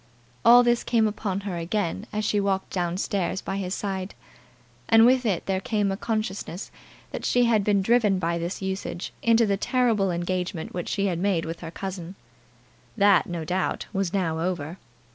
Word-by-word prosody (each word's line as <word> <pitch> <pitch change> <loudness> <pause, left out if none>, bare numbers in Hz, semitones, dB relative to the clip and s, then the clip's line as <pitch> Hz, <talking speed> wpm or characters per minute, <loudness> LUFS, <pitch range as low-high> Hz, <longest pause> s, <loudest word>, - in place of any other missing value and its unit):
All 245 +1 +8
this 240 0 +2
came 225 -2 +2
upon 200 -2 -3
her 195 -3 -4
again 190 +4 -2
as 215 0 -2
she 210 - +1
walked 195 -1 -1
down 175 -1 -1
stairs 190 -2 -1
by 195 - -4
his 190 -1 -2
side; 190 -1 -4 0.7
and 225 0 +7
with 250 0 +4
it 190 -5 -1
there 190 -1 0
came 210 -5 0
a - - -1
consciousness 205 -3 -3 0.4
that - - -5
she 245 - +3
had 220 -3 +3
been 200 -1 +2
driven 220 -3 +3
by 170 -1 -1
this 175 +3 -4
usage 190 -1 -4
into 230 0 +4
the 200 -2 +1
terrible 225 -4 +1
engagement 175 -1 -3
which 175 -1 -4
she 200 -1 0
had 175 -4 -1
made 185 -3 +1
with 165 +1 -5
her 165 - -7
cousin. 185 0 -6 0.8
That, 200 -3 +5
no 170 -2 -4
doubt, 185 +3 -1
was 195 -3 -1
now 170 -5 -1
over. 170 -1 -3
195 Hz, 180 wpm, -25 LUFS, 180-210 Hz, 0.8 s, All